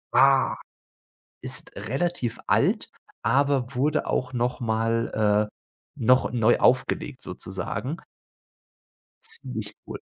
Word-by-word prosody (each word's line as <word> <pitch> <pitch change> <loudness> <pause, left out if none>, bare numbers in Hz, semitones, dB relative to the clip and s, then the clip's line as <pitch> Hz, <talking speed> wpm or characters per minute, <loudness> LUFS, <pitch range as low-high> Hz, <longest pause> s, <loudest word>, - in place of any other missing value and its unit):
Ah, 135 -1 +5 0.8
ist - - -5
relativ 135 - -2
alt, - - +2 0.3
aber 140 -2 +2
wurde 145 +4 +1
auch 125 0 -1
noch 120 +1 -1
mal 110 -2 +1
äh, - - -27 0.4
noch 125 +3 +4
neu 120 -1 +4
aufgelegt 130 +1 +1
sozusagen. 95 - -4 1.3
Ziemlich 450 +1 -4
cool. - - -6
125 Hz, 95 wpm, -25 LUFS, 110-135 Hz, 1.3 s, Ah